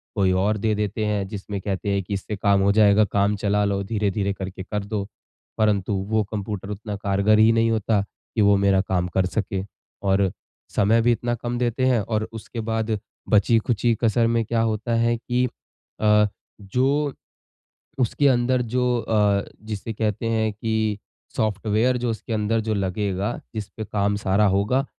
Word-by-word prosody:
कोई 95 -3 +2
और 100 +3 +1
दे 110 +1 0
देते 105 +1 -2
हैं 105 -2 -1
जिसमें 100 0 -5
कहते 100 0 -3
हैं 100 -1 0
कि 100 - -5
इससे 100 +2 -3
काम 100 0 +2
हो 100 +1 +4
जाएगा, 105 0 +5
काम 100 0 +1
चला 105 0 +1
लो, 100 -1 0
धीरे-धीरे 100 -1 -1
करके 95 -1 -6
कर 105 +1 -3
दो, 100 -1 -3 0.5
परंतु 105 -2 +1 0.2
वो 110 -1 +2
कंप्यूटर 100 -2 -4
उतना 105 0 -5
कारगर 100 +1 +2
ही 110 +1 +6
नहीं 115 0 +2
होता 110 -1 +1
कि 105 +2 -6
वो 100 0 +5
मेरा 100 -1 +3
काम 90 -2 -1
कर 95 - +3
सके। 95 0 -2 0.4
और 95 -1 +2 0.4
समय 110 +3 +4
भी 120 +1 +3
इतना 120 +1 -1
कम 120 +1 -4
देते 125 +1 0
हैं 125 -2 +3
और 110 +1 -2
उसके 115 +1 -7
बाद 110 -1 0 0.3
बची-खुची 115 +2 +3
कसर 115 +1 +3
में 115 0 +1
क्या 115 +1 0
होता 115 +1 0
है 115 +1 +2
कि 125 +1 0 0.6
अ, 105 -1 +5 0.3
जो, 135 +8 0 0.9
उसके 135 +3 +2
अंदर 125 0 +2
जो 125 +1 0
अ, 105 -3 +2 0.2
जिसे 110 +1 -5
कहते 110 0 -2
हैं 110 -1 +1
कि 110 0 -1 0.4
सॉफ्टवेयर 110 +3 +1
जो 120 - 0
उसके 115 +1 -5
अंदर 110 +1 +1
जो 110 0 -1
लगेगा, 100 +1 -1 0.2
जिसपे 110 0 -5
काम 100 0 0
सारा 100 0 +2
होगा, 105 +8 +1
105 Hz, 170 wpm, -23 LUFS, 100-115 Hz, 0.9 s, ही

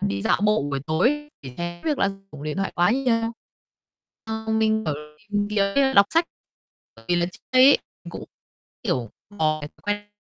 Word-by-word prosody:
đi 100 0 -1
dạo - - +2
bộ 210 -6 +3
buổi 140 -1 -2
tối 255 - +1
để 130 -2 -9
tránh 175 0 -5
việc 300 -3 0
là - - +3 0.2
dùng 145 -1 -9
điện 155 +2 -3
thoại 195 0 -1
quá 175 +3 +3
nhiều. 235 -3 +1 0.9
Ờ, 220 0 -5
mình, 220 0 +2
kiểu, 150 - 0 0.4
tìm 205 0 0
kiếm 215 +7 +2
đọc 200 -3 +7
sách, 330 +1 +5 0.7
bởi 115 - -16
vì 175 - +3
là 175 0 +2
trước 180 - -11
đây 255 0 +7
ấy 280 - +7 0.3
mình - - -8
cũng, - - -7 0.6
kiểu, 130 - -1 0.3
có 155 -1 +2
cái 145 - -6
thói - - -30
quen 205 0 -2
205 Hz, 200 wpm, -24 LUFS, 155-225 Hz, 0.9 s, đọc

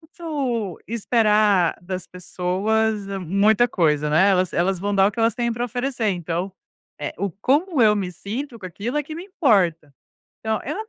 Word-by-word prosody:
não 320 - -21
posso 265 - -3
esperar 210 -5 +2
das 185 0 -5
pessoas 200 +4 -1
muita 200 +7 +3
coisa, 150 -6 +1
né, 170 +7 +4
elas 185 -2 +2
elas 180 +2 +1
vão 205 +2 -2
dar 195 0 +5
o - - -3
que 230 - -4
elas 225 -1 +2
têm 235 -1 -1
para 240 +1 -4
oferecer, 245 -1 -2
então, 175 0 -2 0.5
eh, 145 - -4
o 200 +2 -1
como 280 - +1
eu 210 -1 +5
me 195 -3 -2
sinto 230 - -6
com 195 - -13
aquilo, 205 +9 -4
é 295 - +1
que 310 +2 -8
me 340 +3 -7
importa. 190 - +1 0.5
Então 220 -1 -1
eu 300 - -4
210 Hz, 180 wpm, -22 LUFS, 180-240 Hz, 0.5 s, dar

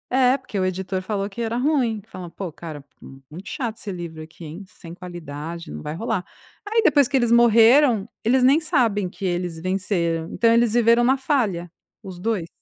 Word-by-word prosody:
É, 255 +1 +3
porque 220 -6 -6
o 185 - +1
editor 185 0 -2
falou 200 0 -3
que 210 +4 -7
era 230 0 -2
ruim. 250 -5 +1
Fala: 180 -5 -9
"Pô, 180 0 -6
cara, 155 -2 -9 0.2
muito 135 +8 -12
chato 230 -4 -4
esse 210 - -6
livro 170 -3 -7
aqui, 160 +2 -12
hein, 165 +6 -8
sem 170 -2 -12
qualidade, 170 -2 -8
não 75 0 -7
vai 150 - -5
rolar". 215 -1 -2 0.4
Aí 450 +1 +3
depois 290 - +4
que 280 - -3
eles 240 -2 +1
morreram, 235 0 +5 0.2
eles 250 +3 +3
nem 275 +5 +5
sabem 240 - +1
que 195 - -7
eles 175 -2 -2
venceram, 175 -2 -1
então 230 -1 +3
eles 235 -1 +3
viveram 235 0 +4
na 260 +3 +3
falha, 215 - -1 0.3
os 190 -3 -9
2. 195 -4 -2
200 Hz, 190 wpm, -22 LUFS, 175-240 Hz, 0.4 s, morreram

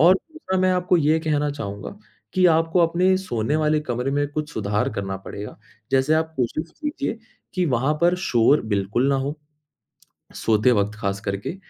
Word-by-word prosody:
और 175 +4 +7 0.2
दूसरा 245 -13 -3
मैं 185 0 +3
आपको 180 0 +2
ये 155 0 +3
कहना 150 -2 0
चाहूँगा 100 -8 -6 0.4
कि 185 -1 +5
आपको 165 +2 +2
अपने 180 +3 +3
सोने 140 - -1
वाले 155 0 +2
कमरे 125 -2 -2
में 145 0 +1
कुछ 150 0 -4
सुधार 105 0 0
करना 95 -1 -3
पड़ेगा, 100 +2 -8 0.3
जैसे 135 +3 +3
आप 160 0 0
कोशिश 150 +6 -2
कीजिए 290 -6 -3 0.4
कि 180 -1 +1
वहाँ 130 +5 +1
पर 175 +1 +5
शोर 120 +5 +4
बिल्कुल 100 +6 0
ना 140 - +3
हो। 140 +3 -2 1.0
सोते 110 +2 +3
वक़्त 105 -2 +1
ख़ास 100 -1 -2
करके 100 - -3
145 Hz, 170 wpm, -23 LUFS, 110-170 Hz, 1.0 s, और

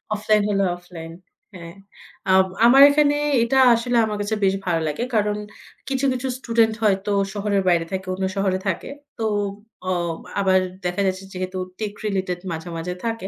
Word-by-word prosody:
Offline 215 0 +2
হলে 200 -1 +1
offline 170 -2 -10 0.4
হ্যাঁ। 170 -1 -10 0.5
আ - - +5 0.3
আমার 260 +3 +7
এখানে 290 0 +3 0.3
এটা 265 +3 +1 0.2
আসলে 235 +1 0
আমার 210 -1 -3
কাছে 205 +2 -1
বেশ 195 0 +3
ভালো 170 -3 0
লাগে 150 +10 -2
কারণ 210 -1 +1 0.5
কিছু, 270 0 0
কিছু 255 +1 -3
স্টুডেন্ট 230 -3 +2
হয়তো 200 -1 +1 0.2
শহরের 205 -1 0
বাইরে 170 -2 +2
থাকে, 190 0 -4
অন্য 190 +1 -2
শহরে 190 -1 +1
থাকে। 185 - -2 0.3
তো 225 - -2 0.6
অ - - +1 0.5
আবার 190 -1 +4 0.3
দেখা 180 +2 -1
যাচ্ছে 185 0 -2
যেহেতু 185 0 -4 0.2
টেক 210 -2 -3
রিলেটেড 190 -3 -2
মাঝে, 165 +1 -6
মাঝে 175 +2 -4
থাকে। 225 -4 -3
200 Hz, 165 wpm, -22 LUFS, 185-225 Hz, 0.6 s, আমার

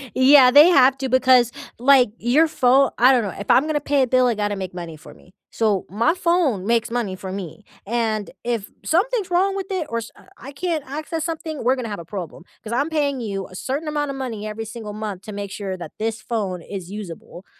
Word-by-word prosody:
yeah, 260 -1 +7
they 295 +5 +8
have 270 -4 +5
to 265 -1 -3
because, 255 -2 +4 0.3
like, 255 -2 +5
your 280 +8 +3
phone 265 -2 +3
I 250 +3 +6
don't 245 -4 +3
know, 200 - -4
if 200 - -8
I'm 270 - +5
gonna 300 -1 0
pay 285 -1 +1
a - - 0
bill, 255 0 +3
it 235 - +1
gotta 205 -1 -1
make 185 -2 -6
money 170 -3 -7
for 155 - -14
me. 180 - -21 0.2
So 210 -4 0
my 230 - +1
phone 340 - +1
makes 235 0 +1
money 225 -6 -2
for 185 0 -7
me, 195 +2 -7 0.2
and 220 -2 -1
if 235 -4 -3
something's 395 +2 0
wrong 385 +3 +2
with 390 -1 -4
it 360 -5 -2
or 230 0 -2
s 225 - -9 0.3
I 275 +3 -10
can't 320 0 -2
access 310 +3 -4
something, 320 -4 -5
we're 255 +2 +3
gonna 250 -3 -5
have 205 -4 -5
a 165 - -9
problem, 175 -3 -7 0.2
'cause 225 +1 -6
I'm 285 +6 0
paying 285 -5 -1
you 195 -3 -4
a 185 - -14
certain 275 - -4
amount 295 -1 -2
of 270 - -7
money 225 -5 -5
every 220 +1 -5
single 220 -2 -8
month 210 -3 -5
to 215 - -8
make 200 -1 -6
sure 190 -2 -5
that 175 - -8
this 220 0 -2
phone 200 -6 -3
is 190 +1 -8
usable. 190 -2 -9
240 Hz, 230 wpm, -21 LUFS, 205-285 Hz, 0.3 s, they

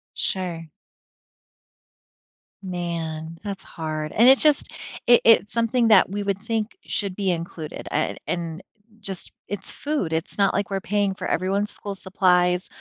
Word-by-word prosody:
Sure. 175 -4 -2 2.0
Man, 165 -3 -4
that's 200 -2 -5
hard. 155 -1 -4
And 230 +3 +5
it's 265 +1 +7
just 300 -2 +3 0.3
it 240 0 +7
it's 225 -2 +5
something 230 0 +2
that, 205 -5 +6
we 205 +1 -3
would 200 -1 -1
think, 225 - -2
should 200 -3 -2
be 195 -1 -1
included, 165 -2 -5
a 155 - 0
a - - -14
and 170 0 -3 0.4
just 195 -3 -6 0.2
it's 195 0 -4
food. 285 - -2
It's 160 +4 -2
not 195 -1 +4
like 200 0 0
we're 195 -1 -1
paying 205 -1 0
for - - -5
everyone's 195 +4 0
school 200 -1 -5
supplies 180 -2 +2
190 Hz, 150 wpm, -24 LUFS, 170-205 Hz, 2.0 s, it's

